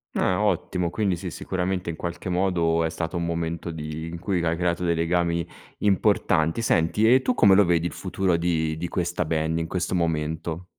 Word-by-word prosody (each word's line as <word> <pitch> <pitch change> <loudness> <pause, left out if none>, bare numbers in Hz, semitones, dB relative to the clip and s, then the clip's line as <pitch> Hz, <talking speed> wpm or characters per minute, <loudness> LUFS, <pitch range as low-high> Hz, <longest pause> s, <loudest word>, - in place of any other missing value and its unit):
Ah 90 +2 +1
ottimo! 90 -3 0
Quindi 100 0 0
sì, 85 - -6
sicuramente 90 -1 -3
in 80 - -3
qualche 85 +2 -5
modo 90 -3 +1
è 80 - 0
stato 80 +1 -4
un 85 - -1
momento 85 0 -3
di 80 0 -6
in 85 0 -7
cui 90 -2 -1
hai 80 0 0
creato 90 0 0
dei 85 - +2
legami 85 0 0 0.3
importanti. 100 -3 +2
Senti, 105 +2 +2
e 130 - +5
tu 125 - +1
come 100 -5 +5
lo 100 - +6
vedi 85 -2 +1
il - - -7
futuro 95 -1 -1
di 80 -2 0
di 85 +2 -4
questa 90 +1 -1
band 80 +1 -1
in 80 - -2
questo 90 0 -1
momento? 80 +1 -2
85 Hz, 195 wpm, -25 LUFS, 80-90 Hz, 0.3 s, lo